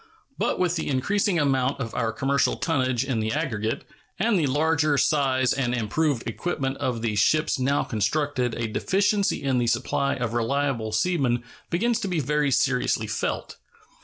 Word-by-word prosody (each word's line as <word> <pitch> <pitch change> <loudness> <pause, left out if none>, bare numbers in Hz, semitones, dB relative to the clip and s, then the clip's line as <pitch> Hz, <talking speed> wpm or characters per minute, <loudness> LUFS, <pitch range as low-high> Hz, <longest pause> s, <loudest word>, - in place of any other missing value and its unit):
But - - 0
with 180 -1 +1
the 160 - -3
increasing 180 +8 +1
amount 135 -3 +1
of 115 -4 -4
our 115 -2 0
commercial 135 +3 +1
tonnage 130 -6 0
in 130 -4 -1
the 110 0 -1
aggregate 115 -8 -2 0.3
and 230 -1 +2
the 150 - +1
larger 150 +1 +2
size 135 -3 +2
and 125 -2 0
improved 125 +3 0
equipment 135 +1 -2
of 125 -5 -2
the 110 -2 0
ships 155 +8 +2
now 140 +3 +1
constructed 125 +3 -1
a 115 -1 -2
deficiency 200 - +1
in 135 -2 +1
the 120 - 0
supply 135 +4 0
of 120 -4 -3
reliable 120 -1 0
seamen 125 -1 +1 0.3
begins 225 +7 +1
to - - -3
be 180 -3 -1
very 150 +1 +1
seriously 125 -3 +1
felt. 105 - -3
135 Hz, 160 wpm, -25 LUFS, 120-155 Hz, 0.3 s, and